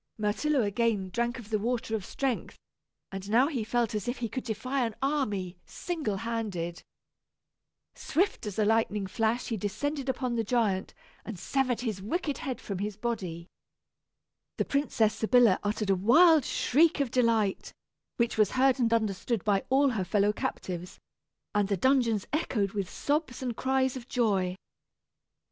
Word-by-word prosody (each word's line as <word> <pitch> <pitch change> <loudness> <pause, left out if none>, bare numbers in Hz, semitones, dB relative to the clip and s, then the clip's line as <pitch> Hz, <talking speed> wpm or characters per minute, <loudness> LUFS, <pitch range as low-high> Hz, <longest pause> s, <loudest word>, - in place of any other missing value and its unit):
Myrtillo 230 +6 +1
again 205 -2 0
drank 235 +4 -1
of 230 -3 -11
the 215 - +1
water 230 0 -2
of 210 - -3
strength, 265 -4 -3 0.5
and 195 +1 -6
now 240 +5 +4
he 265 -8 -2
felt 235 0 0
as 210 0 -3
if 245 +1 -2
he 235 - -2
could 255 - -4
defy 255 +4 -2
an 225 -2 -2
army, 210 -11 -1
single 310 - -3
handed. 200 -7 -3 1.1
Swift 355 - -1
as 205 - -5
a 215 - +3
lightning 210 -2 +1
flash 225 +4 -1
he 225 - -1
descended 270 +8 -3
upon 255 -1 -1
the 230 -1 0
giant, 210 -4 0 0.3
and 220 -4 -7
severed 255 +5 0
his 215 -6 -3
wicked 290 - -2
head 260 -6 -4
from 195 -3 -5
his 205 0 -3
body. 195 -8 -3 1.1
The - - 0
Princess 250 -6 +1
Sybilla 230 -3 +4
uttered 205 0 0
a - - +4
wild 305 - +6
shriek 315 +4 +3
of 275 -4 0
delight, 230 -6 +1 0.5
which 235 -2 0
was 210 -2 +3
heard 265 0 +3
and 230 -2 +2
understood 220 -1 0
by 200 -2 +2
all 275 +2 +4
her 220 -7 -1
fellow 205 +2 +2
captives, 180 -3 -4 0.6
and 205 -1 +2
the 200 -1 0
dungeons 235 -3 +2
echoed 220 - 0
with 200 -3 -3
sobs 290 -3 -2
and 245 -3 -2
cries 260 +1 +1
of 245 -2 -8
joy. 195 -8 +1
230 Hz, 160 wpm, -29 LUFS, 205-255 Hz, 1.1 s, wild